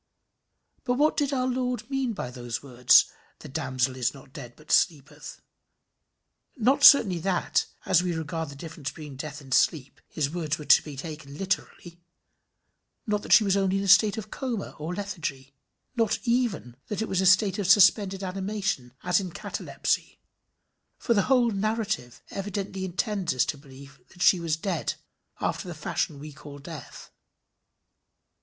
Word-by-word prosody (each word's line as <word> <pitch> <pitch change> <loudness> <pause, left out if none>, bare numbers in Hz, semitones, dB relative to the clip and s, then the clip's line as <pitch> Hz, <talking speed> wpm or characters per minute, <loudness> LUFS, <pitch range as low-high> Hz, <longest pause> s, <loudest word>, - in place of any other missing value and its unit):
But 245 - 0
what 300 +4 +2
did 290 -2 0
our 255 -2 0
Lord 250 -2 -2
mean 270 -3 -1
by 125 -11 -5
those 120 -1 -6
words 125 -2 +5 0.3
"The - - -11
damsel 130 -3 -1
is 125 0 -1
not 135 0 -15
dead, 120 -6 -9
but 155 - -11
sleepeth"? 145 -4 0 1.2
Not 260 +5 +2
certainly 200 -13 +8
that, 180 +1 0 0.2
as 175 - +4
we 180 -1 -1
regard 160 0 -4
the 140 - -10
difference 155 -1 -6
between 150 -4 -10
death 150 +2 -7
and 135 -2 -6
sleep, 140 -2 +1
his 150 -3 -2
words 155 -3 -2
were 150 - -9
to - - +7
be 145 -3 -9
taken 150 -1 -8
literally; 175 -2 -4 1.0
not 210 -1 0
that - - -8
she 220 - +8
was 195 -2 +2
only 195 -1 +1
in 195 - -1
a - - -3
state 200 +2 +5
of 215 -1 -7
coma 245 -7 -4
or 160 +4 -4
lethargy; 155 -9 -5 0.4
not 225 -3 +1
even 235 - -1
that 210 0 -2
it - - -4
was 190 -1 0
a 185 -1 +7
case 200 -2 -3
of 200 - -1
suspended 195 -1 +5
animation 190 - -3
as 180 +1 +2
in 190 -2 -4
catalepsy; 170 - -3 0.8
for 235 - +1
the 200 +1 +1
whole 245 -3 +4
narrative 215 - -2
evidently 195 -1 -4
intends 190 - -2
us 130 - +3
to - - -3
believe 140 0 -15
that 180 -1 -6
she 185 - +5
was 165 -2 -1
dead 190 +4 -2 0.4
after 190 - -2
the 175 - -6
fashion 150 0 -2
we 150 +1 -9
call 145 0 -11
death. 150 -1 -10
180 Hz, 165 wpm, -26 LUFS, 145-210 Hz, 1.2 s, certainly